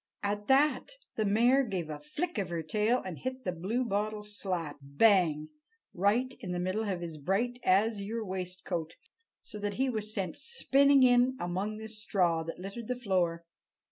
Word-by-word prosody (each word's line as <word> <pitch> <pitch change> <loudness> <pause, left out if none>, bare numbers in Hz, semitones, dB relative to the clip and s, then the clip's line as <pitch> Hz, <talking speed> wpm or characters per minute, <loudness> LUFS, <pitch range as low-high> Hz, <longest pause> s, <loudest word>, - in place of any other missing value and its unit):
At 205 +1 -2
that 290 - +3 0.2
the 215 - 0
mare 235 +7 +4
gave 190 -9 -3
a 150 - -6
flick 235 - -3
of 190 -3 -2
her 170 -1 -3
tail 215 +9 +1
and 180 -4 -6
hit 260 0 -5
the 180 - -1
Bluebottle 210 +3 -1
slap! 180 -8 -3
bang! 155 0 +3 0.4
right 220 +8 +1
in 185 -8 -5
the 175 - -2
middle 185 +5 -1
of 180 -3 -2
his 165 -3 -6
bright 225 - 0
azure 215 +3 +1
waistcoat, 180 -3 -4 0.5
so 210 - -9
that 205 -1 -2
he 265 0 +1
was 215 -2 -3
sent 190 -6 -3
spinning 280 - +4
in 250 +1 +4
among 190 +5 -2
the 220 0 -7
straw 195 -6 0
that 165 +1 -6
littered 200 +5 -7
the 250 - -1
floor. 180 -7 0
205 Hz, 170 wpm, -30 LUFS, 180-235 Hz, 0.5 s, mare